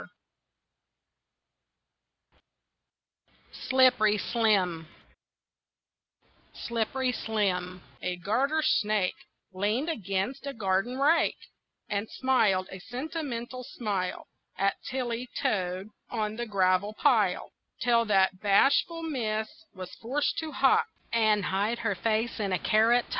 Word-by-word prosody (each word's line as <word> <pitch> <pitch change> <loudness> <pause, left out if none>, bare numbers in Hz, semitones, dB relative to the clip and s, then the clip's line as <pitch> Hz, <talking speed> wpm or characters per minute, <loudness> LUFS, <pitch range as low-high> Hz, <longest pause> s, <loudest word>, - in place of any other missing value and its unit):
SLIPPERY 250 -5 +5
SLIM 190 -7 +1 1.8
Slippery 240 +3 -1
Slim, 185 -6 -2 0.2
a 180 0 -2
garter 260 - +1
snake, 210 -7 +2 0.4
Leaned 210 - 0
against 205 - -2
a 280 - -3
garden 200 +3 0
rake 300 +5 +3 0.5
And 205 +1 -1
smiled 215 -8 +2
a 190 - -7
sentimental 255 - -5
smile 200 -7 -3 0.3
At 195 +1 +2 0.2
Tilly 250 -1 -3
Toad, 185 0 -1 0.2
on 215 -2 -2
the 240 +1 -4
gravel 195 0 +2
pile, 215 -9 +2 0.3
Till 235 -1 +3
that 190 -3 +2
bashful 280 - +3
miss 220 -8 -2 0.3
was 185 -1 -8
forced 275 +6 -1
to 315 -1 -5
hop 370 +12 +3 0.3
And 215 -3 +3
hide 205 +6 0
her 225 -3 0
face 225 +5 -1
in 200 -2 -1
a 185 - +2
carrot 230 +5 +3
top. - - -22
220 Hz, 105 wpm, -28 LUFS, 195-255 Hz, 1.8 s, SLIPPERY